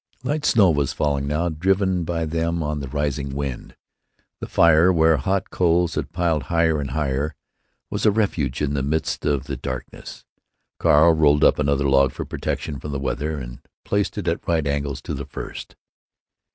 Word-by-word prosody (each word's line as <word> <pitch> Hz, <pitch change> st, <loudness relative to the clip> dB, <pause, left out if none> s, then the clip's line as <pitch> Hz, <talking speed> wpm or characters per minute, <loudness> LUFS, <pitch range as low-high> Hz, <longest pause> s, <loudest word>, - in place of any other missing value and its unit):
Light 150 Hz, +3 st, -2 dB
snow 100 Hz, -, +5 dB
was 70 Hz, -3 st, 0 dB
falling 70 Hz, -2 st, -1 dB
now, 75 Hz, +4 st, 0 dB
driven 95 Hz, +2 st, 0 dB
by 85 Hz, 0 st, -2 dB
them 85 Hz, +1 st, -1 dB
on 75 Hz, 0 st, -2 dB
the 70 Hz, -, -5 dB
rising 70 Hz, 0 st, -2 dB
wind. 70 Hz, -3 st, -5 dB, 0.6 s
The -, -, -6 dB
fire, 85 Hz, +2 st, +5 dB
where 80 Hz, -2 st, +4 dB
hot 95 Hz, +8 st, -1 dB
coals 85 Hz, -1 st, +2 dB
had -, -, -3 dB
piled 85 Hz, -6 st, 0 dB
higher 80 Hz, -3 st, +2 dB
and 70 Hz, -, -4 dB
higher, 75 Hz, 0 st, -2 dB, 0.6 s
was -, -, -3 dB
a 110 Hz, -, +6 dB
refuge 85 Hz, -, -1 dB
in 70 Hz, -1 st, -1 dB
the 70 Hz, -, 0 dB
midst 75 Hz, +3 st, -2 dB
of 70 Hz, -3 st, +1 dB
the -, -, -5 dB
darkness. 65 Hz, 0 st, -7 dB, 0.5 s
Carl 80 Hz, +3 st, +5 dB
rolled 75 Hz, -2 st, +3 dB
up -, -, +4 dB
another 70 Hz, -1 st, +1 dB
log, 70 Hz, -1 st, +3 dB
for -, -, -5 dB
protection 70 Hz, -3 st, -4 dB
from 75 Hz, +3 st, -6 dB
the 70 Hz, -, -2 dB
weather, 75 Hz, +3 st, -2 dB
and -, -, -8 dB, 0.3 s
placed 100 Hz, 0 st, -1 dB
it -, -, -4 dB
at -, -, -2 dB
right 80 Hz, -3 st, +1 dB
angles 70 Hz, -1 st, -2 dB
to -, -, -4 dB
the -, -, -5 dB
first. -, -, -8 dB
75 Hz, 180 wpm, -22 LUFS, 70-85 Hz, 0.6 s, a